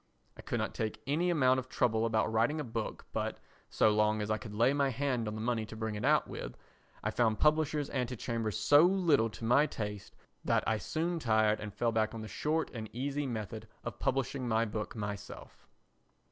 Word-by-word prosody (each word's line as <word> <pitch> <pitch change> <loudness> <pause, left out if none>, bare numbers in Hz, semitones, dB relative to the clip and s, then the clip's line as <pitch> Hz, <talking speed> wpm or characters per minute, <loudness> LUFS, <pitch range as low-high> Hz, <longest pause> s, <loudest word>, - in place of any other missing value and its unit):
I - - -11
could - - -2
take 110 -1 -3
any 160 +6 +1
amount 130 -6 +4
of 130 0 -8
trouble 115 -2 +1
about 110 0 +1
writing 120 +8 +2
a - - -1
book 115 -3 -5
but, - - -2 0.3
so 110 - +4
long 105 0 +2
as 105 +1 -2
I 110 - 0
could 105 -4 -8
lay 120 +5 +4
my 140 -1 +2
hand 130 -3 -1
on 105 - -3
the 110 - -4
money 115 -1 0
to 110 - -9
bring 110 -1 -3
it 105 +1 -5
out 150 +3 +3
with, - - -7 0.5
I - - 0
found 110 -3 +2
publishers' 150 0 +2
antechambers 115 -4 -2
so 145 +7 +6
little 170 -10 +4
to 115 - -8
my 135 +6 +5
taste 105 -5 -6 0.3
that - - +2
I 110 -1 +1
soon 165 +6 -2
tired 110 -4 +2
and 105 0 -6
fell 115 +3 0
back 110 0 0
on 115 - -5
the 110 - -6
short 155 +7 -1
and 110 -3 -6
easy 140 +3 -2
method 110 -5 -5 0.2
of - - -6
publishing 130 0 -1
my 115 0 +2
book 105 -1 -4
myself. 105 -1 -7
115 Hz, 200 wpm, -32 LUFS, 110-140 Hz, 0.5 s, so